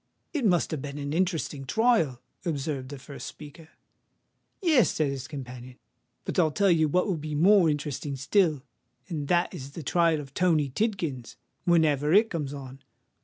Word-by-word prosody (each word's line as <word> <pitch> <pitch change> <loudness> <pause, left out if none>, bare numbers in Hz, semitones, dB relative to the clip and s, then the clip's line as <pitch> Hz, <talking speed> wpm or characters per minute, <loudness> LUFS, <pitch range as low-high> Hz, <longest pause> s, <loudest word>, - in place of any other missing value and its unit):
"It 290 -7 -1
must 175 -3 +2
have 155 -4 -3
been 145 0 -6
an 145 0 -4
interesting 165 -5 -1
trial," 155 - +2 0.2
observed 145 -5 -3
the 145 - -7
first 140 +1 -9
speaker. 155 +2 -11 0.9
"Yes," 315 - +4
said 150 -3 0
his 135 -1 -5
companion; 125 -3 -8 0.5
"but - - -1
I'll 160 -3 +4
tell 195 +5 +2
you 160 -2 +3
what 180 +4 +2
will 190 -5 -1
be 150 0 -5
more 180 +2 +5
interesting 145 -1 -3
still—and 145 - -2
that 175 +3 +2
is 140 -5 -8
the 165 - -7
trial 165 +1 +2
of 140 -2 -9
Tony 160 -5 +2
Tidkins, 165 - -2 0.3
whenever 155 -4 +3
it 215 +3 +5
comes 150 -5 -3
on. 135 -1 -9
150 Hz, 165 wpm, -27 LUFS, 140-175 Hz, 0.9 s, more